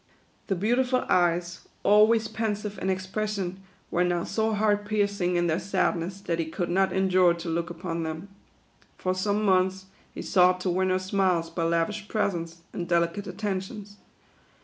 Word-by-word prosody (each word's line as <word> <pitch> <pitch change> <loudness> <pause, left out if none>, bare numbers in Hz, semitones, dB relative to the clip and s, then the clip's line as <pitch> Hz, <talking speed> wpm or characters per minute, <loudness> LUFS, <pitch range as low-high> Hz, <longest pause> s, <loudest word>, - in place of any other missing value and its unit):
The 195 - 0
beautiful 250 +6 +1
eyes, 175 0 +1 0.2
always 215 +2 +5
pensive 210 -2 -3
in 190 - -1
ex 190 0 -1
pression, 195 -2 -3 0.3
were 175 - +2
now 175 -1 0
so 220 0 0
heart 205 0 +2
piercing 200 -4 0
in 175 0 +2
their 165 0 +1
sadness, 185 -1 -1
that 170 -3 -2
he 165 - 0
could 175 +2 -3
not 190 +1 +2
endure 185 -2 +3
to 170 0 -7
look 170 +1 -1
upon 170 -1 -4
them. 160 +3 -5 0.7
For 185 - -1
some 205 +3 0
months, 190 0 +2 0.3
he - - -7
sought 180 0 +4
to 180 - 0
win 185 +1 +1
her 185 - +2
smiles 185 -3 0
by 165 0 -1
lavish 170 +6 0
presents, 170 -6 -2
and 175 - -4
delicate 170 +3 +1
attentions. 205 0 -5
185 Hz, 165 wpm, -27 LUFS, 175-205 Hz, 0.7 s, always